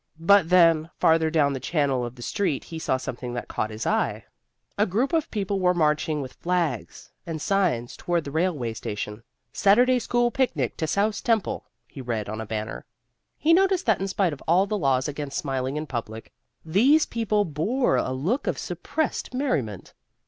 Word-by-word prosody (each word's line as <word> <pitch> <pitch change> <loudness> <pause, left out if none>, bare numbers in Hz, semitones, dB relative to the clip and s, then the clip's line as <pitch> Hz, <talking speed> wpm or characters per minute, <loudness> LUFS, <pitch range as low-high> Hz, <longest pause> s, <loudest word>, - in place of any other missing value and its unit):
But 180 0 +5
then, 165 -3 +5
farther 160 0 +4
down 150 -3 +2
the 135 - -3
channel 140 -4 0
of 120 +1 -6
the 120 - -10
street, 195 - -1
he 165 - -7
saw 130 - 0
something 125 -1 -6
that 120 - -4
caught 110 - -2
his 110 +1 -6
eye. - - 0 0.5
A 210 +2 +2
group 235 - 0
of 320 -2 +1
people 200 -2 -2
were 180 -1 +3
marching 150 -2 +1
with 130 - -9
flags 170 - -2 0.2
and 160 -2 -4
signs 165 -11 0
toward 175 -2 -1
the 140 - -7
railway 155 -8 -1
station. 105 0 -5 0.3
SATURDAY 245 +6 +4
SCHOOL 240 0 +1
PICNIC 175 - 0
TO 160 - -2
SOUSE 205 +5 0
TEMPLE, 225 -4 0 0.2
he 135 - -10
read 115 -5 -3
on 110 +1 -4
a 110 - -7
banner. 110 0 -4 0.5
He 320 +3 +3
noticed 380 0 +3
that 220 -5 +2
in 195 - -1
spite 190 -3 0
of 140 - -10
all 180 +4 +4
the 210 - -2
laws 135 -8 +1
against 145 -1 -4
smiling 135 0 -2
in 155 - -3
public, 115 -5 -6 0.3
these 250 - +4
people 215 -3 0
bore 205 - 0
a - - -1
look 170 - -1
of - - 0
suppressed 310 -4 -3
merriment. 135 - -2
160 Hz, 185 wpm, -25 LUFS, 130-205 Hz, 0.5 s, But